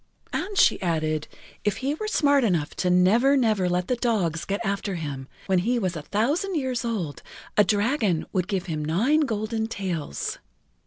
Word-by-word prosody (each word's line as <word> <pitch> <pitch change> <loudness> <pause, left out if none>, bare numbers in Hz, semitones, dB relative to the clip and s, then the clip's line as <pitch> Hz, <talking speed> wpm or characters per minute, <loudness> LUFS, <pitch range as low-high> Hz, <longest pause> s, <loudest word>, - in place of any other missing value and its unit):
And 400 +2 -3
she - - +4
added 155 -3 -1 0.4
if 210 - 0
he 275 +2 -1
were 430 +8 -4
smart 285 -9 +3
enough 170 -9 0
to 180 - +1
never, 220 +10 +4
never 215 -7 +2
let 180 +1 0
the 250 - +1
dogs 200 -10 0
get 200 +1 -2
after 200 -1 -1
him, 140 -5 -5 0.2
when 190 -2 +2
he 240 +7 +1
was 185 -6 -1
a 155 - -4
thousand 285 - 0
years 260 -5 -1
old 190 - -3 0.3
a 210 - +6
dragon 205 - +1
would 185 -1 0
give 190 -3 -2
him 155 -4 -3
nine 215 - +2
golden 220 -5 -1
tails. 180 - -3
205 Hz, 175 wpm, -25 LUFS, 175-245 Hz, 0.4 s, a